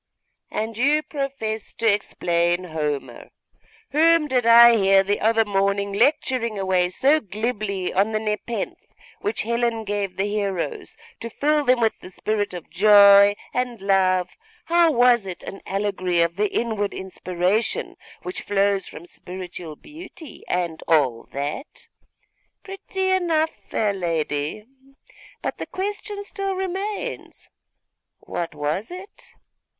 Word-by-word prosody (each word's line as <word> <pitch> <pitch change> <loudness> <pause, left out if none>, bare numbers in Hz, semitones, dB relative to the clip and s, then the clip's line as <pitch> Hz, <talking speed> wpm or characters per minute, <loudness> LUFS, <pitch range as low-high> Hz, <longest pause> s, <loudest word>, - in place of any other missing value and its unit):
'And 220 +1 -3
you 295 +4 +3
profess 275 -8 -4
to 230 - -3
explain 175 -4 +1
Homer? 150 -4 -4 0.6
Whom 325 +1 +4
did 250 -4 +1
I 235 0 +9
hear 195 -2 +4
the 205 +1 0
other 225 0 +3
morning 200 0 0
lecturing 235 -1 +1
away 185 -2 +1
so 275 +11 +3
glibly 210 -4 -3
on 200 +4 +2
the 215 - 0
nepenthe 215 +2 -3 0.4
which 420 +1 -2
Helen 235 0 -1
gave 200 -2 -3
the 195 - 0
heroes, 200 -4 -3 0.2
to 230 - -5
fill 295 +5 +1
them 255 -2 +3
with 225 -1 +3
the - - -11
spirit 205 0 -2
of 175 - -8
joy 200 +1 +7 0.2
and 250 -2 -2
love; 185 -2 +2 0.3
how 335 0 +4
it - - -3
was 240 -4 +4
an 190 +1 -8
allegory 190 -3 0
of 170 0 -2
the 210 +1 0
inward 220 -3 -1
inspiration 185 +3 -1 0.3
which 365 - -5
flows 200 -1 +1
from 170 - -10
spiritual 180 -3 -8
beauty, 320 - -12
and 175 -3 -2
all 135 -8 +2
that? 145 - -6 0.7
pretty 385 -1 -3
enough, 330 -4 +1 0.2
fair 210 -2 0
lady; 165 0 -2 0.8
but - - -3
the - - -5
question 410 +1 -4
still 395 -1 -3
remains, 390 +5 -5 0.7
what 170 -3 -5
was 150 +9 -2
it? 370 +3 -11
210 Hz, 130 wpm, -23 LUFS, 185-265 Hz, 0.8 s, I